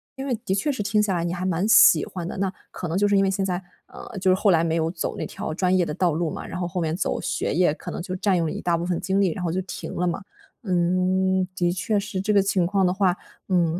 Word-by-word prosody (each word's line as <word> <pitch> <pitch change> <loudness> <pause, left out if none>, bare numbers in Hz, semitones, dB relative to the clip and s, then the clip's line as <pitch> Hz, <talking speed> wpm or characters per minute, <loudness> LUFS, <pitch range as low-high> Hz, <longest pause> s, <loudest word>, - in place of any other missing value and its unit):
因 270 - -5
为 265 - -1
的 190 - 0
确 245 +9 0
是 260 - -3
听 210 +1 +2
下 195 -3 0
来 170 - -1
你 170 - -2
还 185 +1 -3
蛮 185 +3 0
喜 165 -7 +7
欢 175 -2 -6
的。 - - -6
那， 190 -1 0 0.2
可 180 - -5
能 170 - -1
就 205 +1 +3
是 200 - +2
因 195 - +4
为 195 - +2
现 195 0 -1
在 180 0 -2 0.2
呃， 205 - -10
就 185 0 +2
是 - - +5
后 200 +1 +2
来 165 -1 +3
没 165 - 0
有 165 0 +1
走 170 - -3
那 - - -4
条 155 - -5
专 185 +2 +1
业 180 -2 +3
的 150 - -4
道 175 0 +1
路 160 +1 -1
嘛， - - -6
然 180 - -6
后 175 - -1
后 175 0 -3
面 160 0 -1
走 - - -1
学 - - -2
业， 175 -2 +3
可 - - -9
能 - - -5
就 185 +1 -5
占 195 0 +1
用 165 - 0
了 - - -3
一 - - -5
大 170 - +1
部 170 - -3
分 175 -1 -1
精 195 +1 0
力， 185 -4 +2
然 185 - -5
后 170 - 0
就 185 +2 -1
停 185 - -7
了 180 - 0
嘛。 175 +4 -2 0.4
嗯， 185 0 +1
的 175 -2 +1
确 190 +4 -1
是 200 -2 -4
这 210 +2 0
个 200 - +5
情 195 -3 +1
况 195 0 +2
的 180 - +2
话， 190 -2 +2 0.3
嗯， 175 -2 +1
185 Hz, 325 characters per minute, -24 LUFS, 175-195 Hz, 0.4 s, 喜